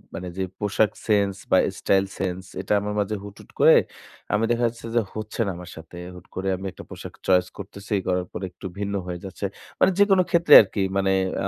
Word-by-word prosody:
মানে 90 - -5
যে 95 - 0 0.2
পোশাক 105 +1 +2 0.2
সেন্স 100 -2 +3 0.2
বা - - +6 0.2
স্টাইল 95 0 +2
সেন্স 95 -1 -3 0.2
এটা 100 +2 -1
আমার 105 0 -3
মাঝে 105 +1 -1
হুট, 100 -1 -10
হুট - - -18
করে - - +8 0.6
আমি 105 +1 +2
দেখা 120 +1 +1
যাচ্ছে 115 0 -7
যে - - +5 0.2
হচ্ছে 110 +1 -6
না 95 - 0
আমার 90 0 -9
সাথে। 80 +1 -12 0.2
হুট 90 - -13
করে 95 +1 -3
আমি 95 - -8
একটা - - -11
পোশাক - - -9
চয়েস 90 -1 +4
করতেছি 100 +1 -7
করার 90 -1 0
পরে 95 - -5
একটু - - -13
ভিন্ন 100 0 -2
হয়ে 90 -1 -4
যাচ্ছে। 95 +1 -5 0.3
মানে 190 - +5
যেকোনো 195 -2 +5
ক্ষেত্রে 170 0 +4
আরকি 100 -1 -3 0.2
মানে 95 0 +2 0.3
আ - - +1
100 Hz, 210 wpm, -24 LUFS, 95-105 Hz, 0.6 s, করে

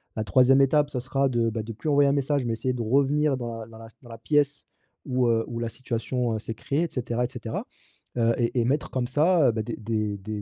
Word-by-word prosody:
La 110 - -1
3e 130 +7 +5
étape, 145 +2 +3
ça 130 -3 -3
sera 135 +2 0
de, 115 -2 +1
bah, 110 0 -3
de 115 +1 -7
plus 135 +8 -4
envoyer 140 -1 +4
un - - +3
message, 140 0 0
mais 115 - -1
essayer 130 +3 -1
de 120 - -4
revenir 140 +4 +2
dans 120 -2 -5
la 110 - -8
dans 115 -1 -13
la 115 0 -11
dans 120 - -15
la 115 - -8
pièce 145 +4 0 0.4
où, 125 -2 +1
heu, 115 -1 +2
où 115 -1 -5
la 115 -1 -2
situation, 120 -1 -2
heu, - - -3
s'est 115 +1 -6
créée 140 +8 -1
et 170 - -2
cetera 120 -1 -1
et - - -5
cetera, 115 -2 -5 0.5
heu, 115 0 +3
et 120 +1 +1
et - - 0
mettre 140 +5 0
comme 125 -2 -1
ça, 155 +3 +3
heu, - - +3
bah, 110 -1 -2
des 115 +1 -5
des 110 -2 -2
des 105 +2 -6
120 Hz, 265 wpm, -26 LUFS, 115-140 Hz, 0.5 s, 3e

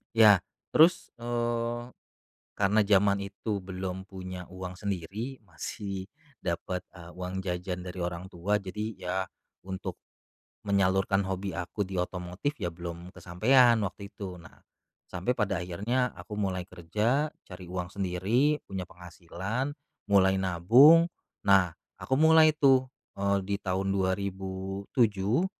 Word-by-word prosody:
Ya, 110 -3 +8 0.3
terus, 165 +4 +5
eee, 120 0 -2 0.7
karena 105 +2 +3
zaman 100 0 +4
itu 100 +1 -3
belum 95 0 -5
punya 95 -2 -7
uang 90 0 -8
sendiri, 100 +7 -4
masih 95 +2 -6 0.3
dapet, 90 +1 -3
eee, 85 -1 -11
uang 90 +1 -5
jajan 90 0 -3
dari 90 0 -7
orang 90 +1 -4
tua, 90 +4 -1
jadi 100 +3 -4
ya 90 0 -4 0.5
untuk 95 -1 -5 0.7
menyalurkan 95 0 +2
hobi 95 -1 -3
aku 90 +4 -3
di 95 - -7
otomotif 90 +9 -3
ya 85 -5 -3
belum 85 +1 -7
kesampaian 120 +7 +4
waktu 100 +1 -8
itu. 95 -3 -7
Nah, 85 - -16 0.5
sampai 110 +9 -2
pada 100 -4 0
akhirnya 115 +9 0
aku 105 - -8
mulai 95 -3 -2
kerja, 105 - 0 0.2
cari 90 -1 -10
uang 90 -1 -3
sendiri, 100 +11 +1
punya 95 -1 -4
penghasilan, 90 - -4 0.4
mulai 95 -1 +5
nabung, 115 - +6 0.4
nah 95 -3 +5 0.2
aku 130 +1 -1
mulai 160 0 +7
tuh, 135 -4 +3 0.2
eee, 100 0 +1
di 100 - -1
tahun 95 +1 0
2007 95 - 0
95 Hz, 125 wpm, -29 LUFS, 90-110 Hz, 0.7 s, Ya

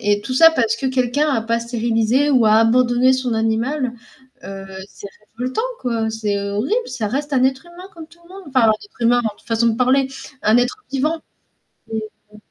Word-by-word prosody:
et 205 -2 +1
tout 255 - -5
ça 325 +4 +7
parce 230 -8 +1
que 265 - -3
quelqu'un 260 +3 +1
a 230 -6 0
pas 230 +1 -1
stérilisé 235 +3 +1
ou 250 -5 +4
a 215 - +5
abandonné 245 +3 +4
son 255 -3 -1
animal, 235 +4 -1 0.5
heu, 195 0 -8 0.2
c'est 200 - -11 0.3
révoltant 255 - -2 0.2
quoi, 230 -3 -1
c'est 215 -2 -2
horrible, 215 - -1
ça 240 -4 -3
reste 285 +5 -3
un 255 - +3
être 265 +4 -1
humain 350 +2 -12
comme 325 -2 -10
tout 340 +1 -22
le 340 - -20
monde, 390 - -11
enfin 255 -5 +4
être 410 - -18
humain, 240 +1 +4 0.2
façon 230 0 0
de 225 - 0
parler, 260 +2 +3 0.4
un 215 +2 +4
être 245 +13 0
vivant. 305 +4 -1 0.7
Mmh 220 - -2 0.4
mh. - - -14
245 Hz, 190 wpm, -19 LUFS, 225-275 Hz, 0.7 s, ça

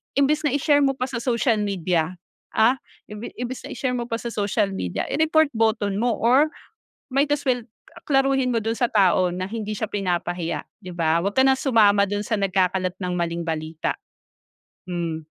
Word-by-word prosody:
imbes 295 +3 +2
na 265 - -1
i-share 290 0 +3
mo 275 -1 +2
pa 255 - -3
sa 240 -2 -3
social 235 -2 +1
media, 180 -4 -1 0.4
ah, 240 +4 +4 0.3
imbe 210 +2 -7
imbes 245 +1 -5
na 280 - -7
i-share 255 - -1
mo 240 -1 -4
pa 230 - -2
sa 235 +1 -5
social 205 -1 0
media, 90 - -3
i-report 315 -1 +3
button 220 -3 0
mo 240 -1 +1
or 260 +6 +4 0.6
might 275 +2 +1
as 290 - -1
well 250 -3 0 0.4
a - - -12
klaruhin 270 -2 +2
mo 230 - +1
dun 225 +1 -2
sa 245 - +2
tao 185 -3 +3
na 185 +1 -3
hindi 215 -1 -4
siya 215 0 -3
pinapahiya 175 -3 -2 0.2
di 180 -1 -9
ba? 165 -1 +1
Wag 200 +1 -1
ka 265 - +4
ng 265 0 +4
sumama 210 -7 +4
dun 205 +1 -2
sa 215 +1 -1
nagkakalat 185 -2 +1
ng 180 -1 -2
maling 170 0 -1
balita. 160 -1 -3 0.9
Hmm, 170 -2 -3
215 Hz, 190 wpm, -23 LUFS, 185-255 Hz, 0.9 s, ah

